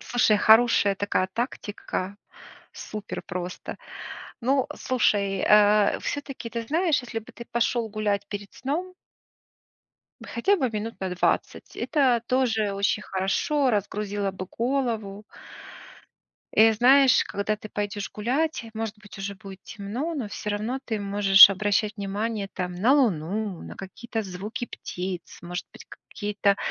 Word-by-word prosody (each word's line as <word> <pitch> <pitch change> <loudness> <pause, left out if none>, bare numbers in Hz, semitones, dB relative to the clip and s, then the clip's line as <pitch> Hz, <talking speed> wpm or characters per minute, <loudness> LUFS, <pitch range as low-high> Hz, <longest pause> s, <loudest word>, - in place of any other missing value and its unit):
Слушай, 240 -4 +3
хорошая 220 -2 +5
такая 195 -1 0
тактика, 205 -4 -4 0.6
супер 210 -1 -7
просто. 180 0 -5 0.6
Ну, 265 +2 +2
слушай, 200 -6 +1
а, 210 0 +5
всё-таки, 275 -5 -5
ты 230 0 -3
знаешь, 315 +3 +1
если 245 -2 -4
бы 220 - -14
ты 235 - -9
пошел 235 -1 +1
гулять 205 -1 -1
перед 205 -1 -7
сном. 340 +8 -3 1.3
Хотя 395 +13 +1
бы 260 -7 0
минут 220 +1 -5
на 190 - -2
20, 180 - -1
это 255 -6 +2
тоже 225 -6 +1
очень 200 +2 0
хорошо, 230 +10 0
разгрузило 205 -1 -1
бы 185 0 -6
голову. 230 -4 -2 1.3
И 225 +1 +6
знаешь, 260 +4 +6
когда 200 +2 -2
ты 215 - -10
пойдешь 205 -1 -4
гулять, 260 +7 -1
может 220 -1 -4
быть 205 -1 -13
уже 200 +1 -4
будет 195 -2 -11
темно, 235 +11 -4
но 255 -8 -3
всё 210 0 -5
равно 220 +6 -2
ты 220 -4 -2
можешь 200 -1 +8
обращать 205 +2 0
внимание, 205 +1 -3
там, 180 -1 -4
на 220 +9 +3
Луну, 205 - 0
на - - -9
какие-то 225 +4 -5
звуки 200 +5 -5
птиц, 180 0 -6
может 175 +1 -5
быть, - - -13 0.2
какие-то 205 -1 0
210 Hz, 135 wpm, -25 LUFS, 200-240 Hz, 1.3 s, можешь